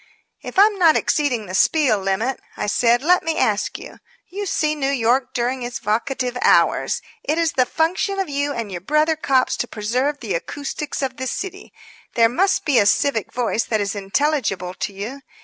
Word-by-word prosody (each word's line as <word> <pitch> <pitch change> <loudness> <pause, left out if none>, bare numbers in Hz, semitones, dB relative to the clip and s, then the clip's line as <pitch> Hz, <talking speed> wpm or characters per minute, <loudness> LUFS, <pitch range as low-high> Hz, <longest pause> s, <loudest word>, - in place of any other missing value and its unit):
"If - - -9
I'm 410 0 +5
not 330 -3 +5
exceeding 255 -8 0
the 185 - -8
spiel 265 +2 +3
limit," 195 +7 -1 0.2
I - - -2
said, 235 +4 +2
"let 360 +3 +4
me 325 -1 -2
ask 210 -1 0
you. - - -12 0.3
You 400 +2 -5
see 305 -3 0
New 280 -3 -1
York 250 0 +1
during 250 +2 -1
its 240 0 -4
vocative 250 +4 -2
hours. - - +3 0.2
It 305 - -1
is 335 -2 +1
the 255 -1 +1
function 365 +5 0
of 390 - -1
you 285 0 -1
and 230 -6 -4
your 175 -2 -5
brother 305 - +2
cops 270 -4 +1
to 245 - -2
preserve 250 +8 -1
the 215 -6 -4
acoustics 285 - -4
of 260 -1 -3
the 260 - -3
city. 385 +9 -5 0.4
There 230 -1 +5
must 375 +11 +1
be 280 -6 +4
a 200 - +3
civic 230 -1 +1
voice 235 -2 -1
that 220 - 0
is 200 -1 -1
intelligible 205 -3 -1
to 205 - -4
you. 215 +8 -7
260 Hz, 190 wpm, -21 LUFS, 220-305 Hz, 0.4 s, I'm